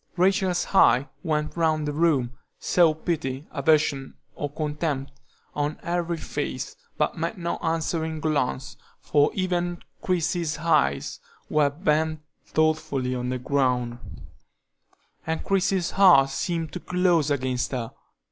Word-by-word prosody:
Rachel's 185 0 +2
eye 135 -6 +5
went 150 -3 -1
round 155 -3 +1
the 145 - -2
room; 145 -6 +2 0.3
saw 170 -3 +3
pity, 150 -4 -3
aversion, 145 -2 +1 0.2
or 145 - -4
contempt, 150 -2 -3 0.4
on 145 +1 -2
every 170 -1 -1
face, - - -4 0.2
but - - 0
met 220 - -2
no 170 -1 -2
answering 160 -1 -1
glance, 145 -4 -1 0.2
for 145 0 +3
even 175 -2 -1 0.2
Christie's 170 -3 0
eyes 155 - +1 0.3
were 150 -2 +4
bent 155 0 0 0.3
thoughtfully 155 -5 0
on 125 0 -2
the 130 - -1
ground, 125 -2 0 1.3
and 160 0 -2
Christie's 190 -2 +1
heart 170 -9 +6
seemed 165 +3 -3
closed 180 -4 +2
against 130 -3 -1
her. 120 -4 -3
155 Hz, 120 wpm, -25 LUFS, 140-170 Hz, 1.3 s, heart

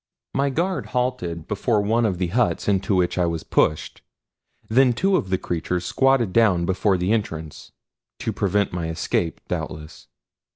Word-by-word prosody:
My 140 +1 +1
guard 175 +7 -1
halted 90 -11 -2
before 105 +2 0
one 110 +3 +2
of 95 -4 -2
the 90 -1 -1
huts 120 +5 0
into 100 0 +1
which 90 0 +1
I 90 - +2
was 85 -1 -3
pushed; 75 - 0 0.7
then 125 +2 +4
two 190 +10 +1
of 95 - -1
the 95 - +1
creatures 90 +1 -3
squatted 130 -1 +2
down 100 -7 +3
before 95 +2 +1
the 90 +3 0
entrance 80 -8 -4 0.5
to - - -3
prevent 100 -1 0
my 85 -2 -2
escape, 80 0 -2
doubtless. 75 0 -6
95 Hz, 160 wpm, -23 LUFS, 85-120 Hz, 0.7 s, then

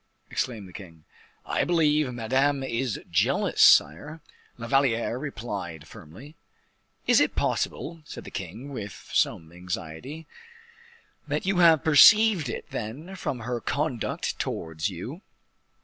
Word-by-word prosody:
exclaimed 115 -7 -3
the 90 - -15
king. 85 -6 -12 0.4
"I - - 0
believe 150 -5 +2
Madame 135 +4 0
is 120 -3 -2
jealous, 85 - +1
sire," 145 - +5 0.4
La 115 - -7
Valliere 120 -2 +1
replied, 100 - -6
firmly. 115 - -13 0.7
"Is - - +5
it - - +1
possible," 165 0 -2
said - - -9
the - - -10
king 100 +9 -7
with 105 -6 -8
some 80 -1 0
anxiety, 90 - -7 1.0
"that 150 +3 -2
you 190 -1 +1
have 165 -4 +6
perceived 175 - +6
it, - - -6
then, 145 - -6
from 130 -9 -4
her 120 +1 -3
conduct 140 -5 -2
towards 80 +3 -3
you? 115 - -7
125 Hz, 125 wpm, -26 LUFS, 95-150 Hz, 1.0 s, have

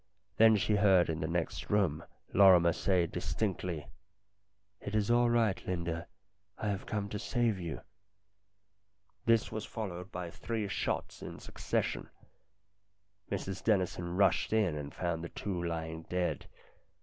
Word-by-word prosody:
Then 110 0 +7
she 105 +1 +2
heard 95 -5 +5
in 80 - -3
the 80 - -1
next 85 +3 -2
room 90 -6 +2 0.3
Lorrimer 90 -4 +7
say 90 -1 +2
distinctly: 90 -3 -2 0.5
" 100 0 -47
It 100 - -4
is 105 +1 +2
all 120 0 +4
right, 115 -5 +2
Linda. 85 -2 -2 0.5
I 105 - -2
have 100 -1 -3
come 105 -2 -2
to 105 - -4
save 115 -5 0
you." 85 -4 -5 1.5
This 115 -1 +3
was 110 - -3
followed 95 -4 -6
by 90 -2 -5
three 110 +1 -3
shots - - -2
in - - -7
succession. - - -2 1.2
Mrs 95 -1 -3
Dennison 90 -4 0
rushed 100 +2 +3
in 105 -8 +2
and 75 -1 -5
found 85 -2 -2
the 85 - -5
two 95 -4 -4
lying 80 -1 -3
dead. 90 -1 -1
95 Hz, 140 wpm, -32 LUFS, 85-105 Hz, 1.5 s, Then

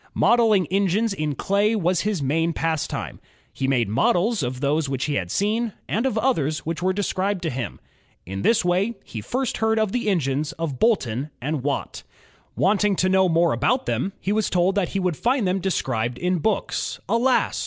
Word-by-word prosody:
Modeling 225 -6 +4
engines 200 +3 +1
in 155 -6 -2
clay 205 - +1
was 180 -3 +1
his 205 -7 -1
main 165 +5 +1
pastime. 160 -2 -2 0.3
He 135 - -2
made 125 -5 +2
models 180 - +2
of 125 -1 -3
those 145 +1 0
which 135 -1 -1
he 150 - -1
had 90 -10 -2
seen, 215 - 0
and 230 +6 0
of 225 - -2
others 155 - 0
which 165 +2 -3
were 185 +1 +2
described 195 -1 -1
to 160 - -1
him. 125 -1 -5 0.5
In 95 +2 -5
this 225 - +3
way 190 +6 +1
he 110 - -7
first 255 - -2
heard 220 0 +1
of 215 -3 +1
the 235 -2 -1
engines 150 -5 0
of 155 -6 -4
Boulton 140 - +1
and 145 +2 -2
Watt. 140 +2 -3 0.5
Wanting 205 0 +2
to 185 +1 +1
know 190 -1 +4
more 165 0 +3
about 250 - +1
them, 195 - -1
he 195 - -2
was 215 0 +1
told 180 +1 +2
that 200 -3 0
he 195 - -2
would 180 -5 -1
find 245 -4 +1
them 185 +1 +1
described 125 -10 -1
in 180 0 0
books. 215 +6 -1
Alas! 235 +5 +2
185 Hz, 190 wpm, -23 LUFS, 145-210 Hz, 0.5 s, Modeling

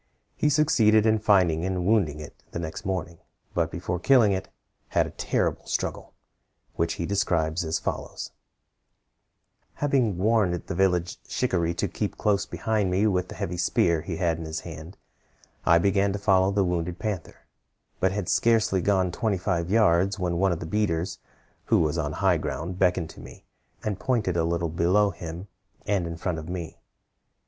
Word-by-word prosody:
He 150 - +2
succeeded 115 -8 +4
in 110 -1 +3
finding 90 -6 +3
and 90 -1 -1
wounding 95 -8 +2
it 75 - -9 0.2
the - - -6
next 80 -1 -5
morning, 90 -3 -3 0.3
but - - +1
before 90 0 -3
killing 120 0 +5
it, 95 0 -2 0.4
had - - +2
a - - -7
terrible - - -1
struggle, - - -3 0.6
which 85 0 0
he 85 - -3
describes 85 -4 0
as 80 0 -1
follows: - - -5 1.4
"Having 130 -9 +1
warned 105 -2 +2
the - - -4
village 90 -1 +1
shikaree 85 -9 0
to - - -1
keep - - -4
close 100 -2 +1
behind 110 -4 -1
me 95 +4 +2
with 90 -3 +1
the - - -9
heavy 90 +1 -4
spear 85 -2 +2
he 80 0 -5
had 85 -2 0
in 80 - -5
his 80 0 -4
hand, 80 +2 -9 0.7
I 85 - +7
began 100 +3 +2
to - - -2
follow 95 -2 +3
the 100 -1 +1
wounded 90 0 -2
panther; 100 -5 -5 0.5
but 95 - +2
had 100 -2 -3
scarcely 110 -5 +2
gone 95 -2 +2
twenty 105 +2 0
five 85 -1 -1
yards, 95 -2 +3
when 90 -3 -1
one 95 0 +3
of 85 - -2
the - - -5
beaters, 85 -2 -1 0.5
who - - +3
was 80 0 +1
on 75 -2 -2
high 95 +1 +2
ground, 85 +3 -4
beckoned 90 -3 +1
to - - -14
me, - - -12 0.4
and 105 -3 -2
pointed 105 -3 0
a 85 -1 +1
little 85 0 -1
below 90 +5 +2
him, 85 +2 -7 0.4
and 95 -4 0
in 85 0 -5
front 85 -1 -2
of 80 +2 -8
me. 85 -3 -6
90 Hz, 175 wpm, -26 LUFS, 85-100 Hz, 1.4 s, I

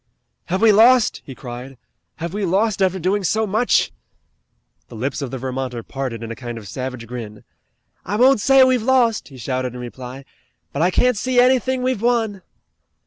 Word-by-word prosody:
"Have 185 +5 -1
we 225 - +7
lost?" 230 +3 +5
he 135 - -9
cried. 125 +1 -9 0.4
"Have 170 +2 -5
we 205 0 -2
lost 195 +3 +1
after 190 0 +2
doing 190 +3 0
so 220 +5 +1
much?" 215 +4 +1 1.0
The - - -12
lips 130 +6 -3
of 135 - -3
the 130 - -5
Vermonter 130 -2 -4
parted 130 -4 -5
in 115 - -6
a - - -5
kind 120 -2 -7
of 105 -3 -9
savage 130 +1 -5
grin. 115 -3 -8 0.6
"I 200 - -3
won't 255 0 +4
say 270 +2 +6
we've 255 -2 +3
lost," 240 -2 +2
he 135 - -13
shouted 130 0 -3
in - - -7
reply, 125 +2 -8 0.5
"but 140 - -2
I 175 - +4
can't 250 +5 +2
see 255 +3 +1
anything 255 0 +3
we've 255 -5 -1
won." 225 -5 0
180 Hz, 185 wpm, -20 LUFS, -, 1.0 s, we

